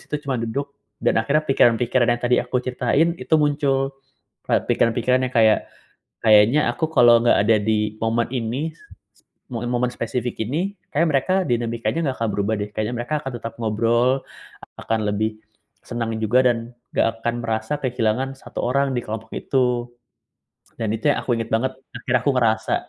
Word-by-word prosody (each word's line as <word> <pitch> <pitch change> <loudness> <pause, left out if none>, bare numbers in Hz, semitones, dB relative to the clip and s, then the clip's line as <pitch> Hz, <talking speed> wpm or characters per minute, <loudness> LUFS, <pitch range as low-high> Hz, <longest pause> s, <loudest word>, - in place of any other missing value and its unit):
situ 150 - -4
cuma 130 -4 -2
duduk, 140 +5 -3 0.3
dan - - +3
akhirnya 150 +7 +1
pikiran-pikiran 120 -2 +3
yang - - -13
tadi 125 0 +3
aku - - -3
ceritain, 130 +6 +1
itu 125 +5 0
muncul. 140 -2 +1 0.6
Kayak - - +2
pikiran-pikiran 120 +2 +2
yang 130 - -16
kayak, 110 -1 +5 0.6
"Kayaknya 110 +6 +6
aku 160 - -2
kalo 120 -1 +7
nggak - - +5
ada 110 +1 +4
di 105 0 -1
momen 115 +1 0
ini, 130 +6 -2
s - - -26
s - - -21 0.6
mo 115 - -3
momen 125 0 0
spesifik 120 +1 -3
ini, 175 - -2 0.2
kayaknya 165 +3 +2
mereka 140 +7 +1
dinamikanya 120 +5 -1
gak - - -11
akan - - 0
berubah 105 +2 0
deh, 105 - -3
kayaknya 110 +3 -2
mereka 150 +5 -1
akan 135 - -6
tetap 115 -1 -6
ngobrol, 115 +3 +2 0.7
ak - - -10
akan 110 -1 +1
lebih, 110 +1 -1 0.5
senang 115 -2 -3
juga 120 +4 +3
dan, 120 -1 +2 0.4
nggak - - +3 0.2
akan 120 0 +1
merasa 110 +2 -2
kehilangan 125 +1 -1
1 - - -9
orang 140 +2 +1
di 120 - 0
kelompok 110 +1 -6
itu." 125 -2 0 0.9
Dan 110 -2 -2
itu 115 - -6
yang - - -2
aku 120 - 0
ingat 115 0 -4
banget, 130 +4 0 0.2
akhirnya 130 -1 0
aku 145 - +2
ngerasa, 110 -3 +1
120 Hz, 175 wpm, -22 LUFS, 115-135 Hz, 0.9 s, kalo